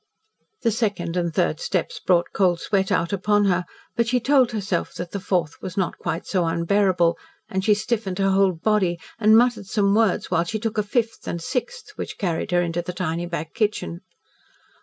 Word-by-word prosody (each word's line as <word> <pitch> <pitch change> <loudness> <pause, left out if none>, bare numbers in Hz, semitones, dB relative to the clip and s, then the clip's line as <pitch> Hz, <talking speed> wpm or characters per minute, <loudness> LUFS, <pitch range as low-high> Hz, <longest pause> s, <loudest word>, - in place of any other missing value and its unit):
The 230 - +3
second 200 -6 -1
and 170 -2 0
third - - 0
steps - - -2
brought 175 -2 +1
cold 180 -3 +2
sweat 195 -1 0
out 170 +3 +1
upon 205 +1 +2
her, 180 -2 +1 0.3
but 235 -1 +1
she 250 +1 +2
told 260 -1 +3
herself 200 -5 -2
that 175 0 -6
the 200 - -3
fourth 175 -5 -1
was 185 0 -7
not 190 -3 -1
quite 165 - -3
so 185 -3 0
unbearable, 170 0 +2 0.3
and 190 0 -2
she 210 +1 +4
stiffened 210 -3 -2
her 195 -1 +2
whole 195 -1 +4
body, 180 -1 +1 0.2
and 220 0 +6
muttered 240 -4 +2
some 200 -1 +2
words 220 -4 +2
while 170 -2 +3
she 195 +6 -3
took 220 0 -2
a - - +4
fifth 225 +2 -2
and 170 - -2
sixth 445 - -4
which - - -5
carried 175 -2 -2
her 175 -1 +2
into 170 0 -2
the 180 +1 -6
tiny 175 -1 -2
back 165 -2 -5
kitchen. 205 - -1
195 Hz, 195 wpm, -23 LUFS, 175-215 Hz, 0.3 s, and